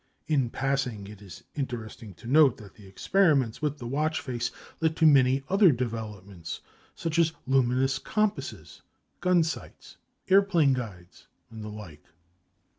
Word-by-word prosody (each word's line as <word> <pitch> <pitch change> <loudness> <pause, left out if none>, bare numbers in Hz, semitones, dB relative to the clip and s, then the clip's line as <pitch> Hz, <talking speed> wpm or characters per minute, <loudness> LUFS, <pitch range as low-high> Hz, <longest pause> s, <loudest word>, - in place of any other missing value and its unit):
In 135 -6 +1
passing, 135 -6 -2
it 105 0 -12
is 95 -6 -12
interesting 115 - -6
to 85 - -16
note 140 -1 +5
that 105 -3 -13
the 105 -3 -16
experiments 140 - +2
with 150 -1 -1
the 125 - -8
watch 150 +6 -1
face 120 -3 -3 0.3
led 160 -1 +1
to 160 - +3
many 135 -2 +5
other 195 -2 +5
developments, 105 - -5 0.3
such 165 0 -2
as 160 -1 +3
luminous 130 0 +2
compasses, 215 0 -3 0.4
gun 180 -2 +3
sights, 160 - -7 0.3
airplane 190 -7 +4
guides, 95 -8 -7 0.2
and 110 -1 -8
the 105 - -6
like. 95 -9 -10
130 Hz, 140 wpm, -27 LUFS, 110-155 Hz, 0.4 s, note